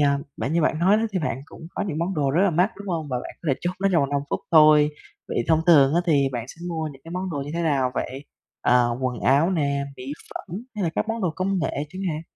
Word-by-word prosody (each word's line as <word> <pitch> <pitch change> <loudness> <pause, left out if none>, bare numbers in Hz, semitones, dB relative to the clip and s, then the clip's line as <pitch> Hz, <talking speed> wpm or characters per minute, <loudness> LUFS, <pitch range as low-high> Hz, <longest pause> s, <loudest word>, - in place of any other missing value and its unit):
ờm, 140 -1 +2
bạn 140 - -2
như 170 0 +2
bạn 155 0 +1
nói 190 +5 +4
đó 220 - 0
thì 190 - 0
bạn 140 -6 -2
cũng 160 - -12
có - - -3
những 180 -7 -3
món 175 +4 -1
đồ 145 -4 +1
rất 165 +7 +3
là 200 - +4
mắc, 180 +5 +2
đúng 200 0 -9
hông? 160 -4 -2
Và 125 -2 -1
bạn - - -7
có - - -8
thể 135 - +3
chốt 175 - -1
nó 195 - +3
trong 170 - +4
vòng 140 - -2
5 140 -1 +1
phút - - -1
thôi. 150 -2 +7 0.4
Vậy 120 - -1
thông 160 -1 +4
thường 145 -4 +6
á, 170 - +4
thì 140 -4 +3
bạn 120 -2 -3
sẽ 165 - -12
mua 160 -2 -2
những 135 -1 -17
cái 165 - -10
món 185 +2 -3
đồ 155 - -4
như 145 - -6
thế 170 - -1
nào 140 -5 +1
vậy? 135 +3 -4 0.4
À, 125 0 +4 0.2
quần 125 -2 -2
áo 140 +7 +3
nè, 140 -5 0
mỹ 130 +2 -6 0.2
phẩm, 175 - -6 0.2
hay 205 -3 -2
là 165 - 0
các - - -1
món 225 +1 -2
đồ 180 - +1
công 190 +1 0
nghệ 165 - -1 0.2
chẳng 185 +5 -7
hạn? 155 -1 -3
155 Hz, 290 wpm, -24 LUFS, 140-175 Hz, 0.4 s, thôi